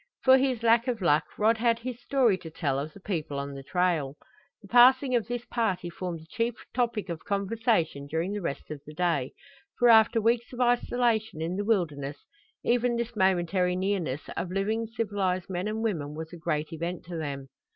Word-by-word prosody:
For 260 0 +7
his 255 -3 0
lack 230 +2 +4
of 240 -3 -1
luck 155 -4 +3
Rod 220 +2 +3
had 230 0 +3
his 245 +1 -6
story 250 -6 +3
to 165 - -9
tell 145 -4 -1
of 150 +3 -4
the - - -13
people 160 -8 -3
on 140 0 -4
the 135 - -7
trail. 155 -3 0 0.5
The - - -12
passing 255 +3 +6
of 235 -3 +1
this 245 0 -4
party 190 -9 -1
formed 170 -2 -5
the - - -15
chief 230 +6 -1 0.2
topic 235 -5 0
of 170 -3 -5
conversation 200 - 0
during 165 +6 -2
the 205 - -3
rest 145 -3 -5
of 150 -2 -6
the 150 - -10
day, 165 -7 0 0.4
for 245 -1 +5
after 225 0 +6
weeks 230 +2 +1
of 245 - -8
isolation 240 -5 +1
in 165 +3 -2
the 205 - -1
wilderness 150 -10 -1 0.4
even 245 0 +2
this 235 0 -3
momentary 180 -1 +2
nearness 185 -7 -2
of 175 - -3
living 215 +4 -1
civilized 200 -5 -2
men 180 +2 -2
and 220 +1 -2
women 155 -9 -2
was 160 +2 -7
a - - -6
great 155 -1 -2
event 170 +2 -4
to 175 0 -7
them. 140 -4 -5
190 Hz, 195 wpm, -28 LUFS, 160-230 Hz, 0.5 s, For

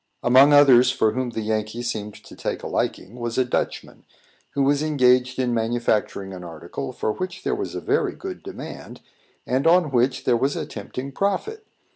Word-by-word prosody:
Among 130 +4 +6
others 135 -4 +7
for 110 -4 +2
whom 130 +2 -2
the 115 -1 -4
Yankee 110 +2 -2
seemed 105 -3 -4
to - - -14
take - - -4
a - - -4
liking, 105 +7 -3
was 120 -1 -3
a 130 - +3
Dutchman, 125 - -3 0.5
who 140 - +2
was 140 +1 +2
engaged 125 -4 +3
in 125 -2 0
manufacturing 110 -4 -1
an 90 -1 -8
article 80 -5 -7
for 110 - -2
which 185 - -5
there 410 - 0
was 405 -1 -4
a - - -4
very - - 0
good 380 -1 -7
demand, - - -9 0.4
and 130 +5 +1
on 170 -3 +4
which 125 +1 +1
there 125 - +3
was 135 +4 0
a - - -3
tempting 135 +2 -7
profit. 400 - -2
125 Hz, 185 wpm, -23 LUFS, 115-145 Hz, 0.5 s, others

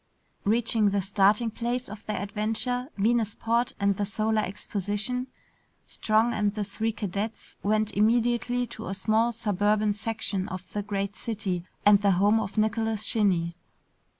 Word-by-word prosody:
Reaching 220 0 +3
the 200 0 0
starting 205 +4 +3
place 245 +3 -2
of 210 0 -9
their 210 - -2
adventure, 220 +5 -1
Venusport 230 +2 +1
and 200 -1 +2
the 205 - 0
Solar 215 +1 +1
Exposition, 205 +5 -3 0.6
Strong 220 +2 +1
and 210 -1 0
the 210 - -1
three 220 +3 -2
cadets 210 +1 -4
went 215 0 +1
immediately 240 +3 +2
to 220 -2 -8
a 195 - -3
small 220 +4 +2
suburban 210 -1 +1
section 205 -2 -3
of 185 0 -8
the 210 - -1
great 200 -1 -3
city 195 -5 -3 0.2
and 205 -1 +7
the 200 -1 +4
home 205 +5 +4
of 215 0 -4
Nicholas 220 0 +1
Shinny. 180 -6 +1
215 Hz, 145 wpm, -27 LUFS, 200-225 Hz, 0.6 s, and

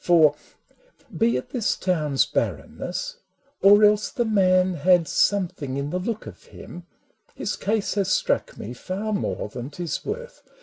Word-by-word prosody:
For, 160 -4 +5 0.8
be 230 +1 +2
it 125 - -7
this 235 -5 0
town's 155 -7 +1
barrenness - - -3 0.2
— 280 +1 -40
or 205 +2 +7
else 210 0 +4
The 240 - -1
Man 185 -3 +3
had 175 +1 +3
something 165 -10 0
in 140 +1 -3
the 180 - -1
look 220 +4 -4
of - - -11
him 175 0 -11 0.2
— 220 -2 -37
His 200 - -3
case 210 0 -1
has 200 -2 0
struck - - 0
me 115 - -7
far 195 +10 -4
more 200 - -2
than 120 +4 -7
't 175 +4 -7
is 170 - -3
worth. 485 +3 -6
185 Hz, 170 wpm, -24 LUFS, 165-215 Hz, 0.8 s, or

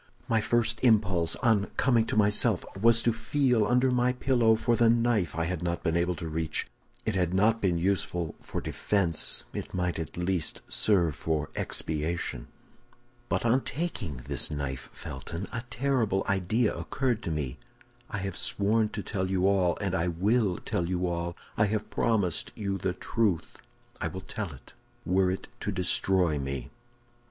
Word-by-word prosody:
"My 115 -1 +2
first 120 0 +1
impulse, 100 -8 +3
on 110 -4 +3
coming 120 -4 +3
to - - -2
myself, 105 -1 +4
was 115 +3 +4
to 120 - +3
feel 120 -1 +1
under 125 +2 +3
my 125 0 +2
pillow 120 -3 +3
for 120 +1 +1
the 115 0 +4
knife 115 -8 +2
I 85 - 0
had 90 0 -2
not 85 0 -2
been 80 -2 +1
able 85 +1 +1
to 85 -1 -6
reach; 80 0 -1 0.4
if 110 - 0
it - - -1
had 90 0 0
not 110 +4 +3
been 90 -3 +2
useful 90 -2 -1
for - - -5
defense, 90 -6 0
it - - -6
might 90 -2 -1
at 80 0 -6
least 90 -2 -1
serve 90 -7 +3
for 75 -1 -2
expiation. 80 -5 -2 0.8
"But 90 +6 0
on 125 +3 +4
taking 110 - -4
this - - +2
knife, 70 -3 -4
Felton, 85 +8 -6
a 115 - -2
terrible 120 -6 0
idea 100 +4 +1
occurred 125 -4 -1
to 95 - -4
me. 75 -6 -3 0.5
I 105 - -3
have 95 -2 -4
sworn 105 +3 +1
to 105 -2 -5
tell 95 -1 -2
you 95 0 +2
all, 95 -3 +2
and 100 -2 -2
I 85 -2 +1
will 95 +3 +1
tell 85 0 -2
you 90 0 0
all. 85 0 -2 0.2
I 105 - +4
have 105 +1 -2
promised 100 -8 0
you 100 -2 -2
the 90 0 -1
truth; 95 -3 -1 0.4
I - - 0
will 95 - -6
tell 100 -4 -5
it, 70 - -14 0.3
were 95 +1 +3
it 95 - -3
to - - -2
destroy 90 -3 +2
me." 65 -2 -4
95 Hz, 170 wpm, -28 LUFS, 85-115 Hz, 0.8 s, myself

